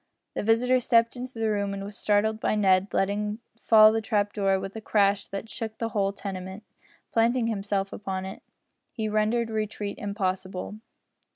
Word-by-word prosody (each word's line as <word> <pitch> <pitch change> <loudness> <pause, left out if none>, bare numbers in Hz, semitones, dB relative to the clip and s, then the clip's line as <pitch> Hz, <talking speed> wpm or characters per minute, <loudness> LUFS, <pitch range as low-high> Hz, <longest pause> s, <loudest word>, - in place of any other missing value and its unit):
The - - -2
visitor 240 +4 +3
stepped 230 -1 +3
into 255 +1 -7
the 220 -1 0
room 200 -1 -1
and 195 - -5
was 205 +1 -7
startled 215 +2 +1
by 215 - 0
Ned 195 -1 +3
letting 210 +2 0 0.2
fall 215 -2 +6
the 225 0 0
trap 205 -2 0
door 195 -2 +1
with 195 +2 -7
a 220 - -5
crash 200 -2 +2
that 195 +3 -6
shook 220 -1 -5
the 230 - -2
whole 200 -2 0
tenement. 190 0 -7 0.5
Planting 235 +1 +2
himself 200 -3 -2
upon 190 -2 -4
it, 190 - -8 0.5
he 220 -2 -3
rendered 215 +2 +1
retreat 210 -1 -3
impossible. 190 0 -3
210 Hz, 170 wpm, -26 LUFS, 195-225 Hz, 0.5 s, fall